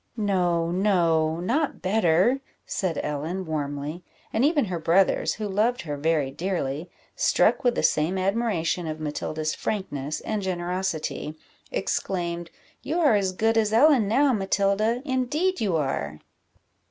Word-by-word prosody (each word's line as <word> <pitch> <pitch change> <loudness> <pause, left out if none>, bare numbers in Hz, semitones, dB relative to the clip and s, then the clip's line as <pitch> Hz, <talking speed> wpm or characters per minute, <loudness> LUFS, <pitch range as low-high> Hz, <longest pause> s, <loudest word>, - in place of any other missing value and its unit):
"No, 175 -5 +1
no 170 -4 +2
not 275 - -1
better," 190 +5 +3 0.2
said 175 -6 -2
Ellen, 155 +6 -3
warmly; 150 +1 -4 0.3
and 225 - +2
even 290 -2 +3
her 180 -4 -3
brothers, 175 +4 +2
who 215 -1 -4
loved 215 +5 +1
her 150 -3 -4
very 145 -2 0
dearly, 165 -1 -3 0.3
struck - - +3
with 245 -1 +2
the - - -1
same 160 +5 +2
admiration 185 -4 0
of 155 0 -4
Matilda's 155 +1 -3
frankness 155 -8 -3
and 215 -2 -2
generosity, 175 -4 -3 0.3
exclaimed 175 - -2 0.3
"You 325 +5 -2
are 300 -8 +5
as 195 -2 +1
good 225 +4 +2
as 215 -1 +1
Ellen 255 -2 +5
now, 270 +5 +3
Matilda 200 +4 +1
indeed 295 +8 0
you 195 -6 +1
are!" 75 - -2
185 Hz, 135 wpm, -25 LUFS, 160-220 Hz, 0.3 s, are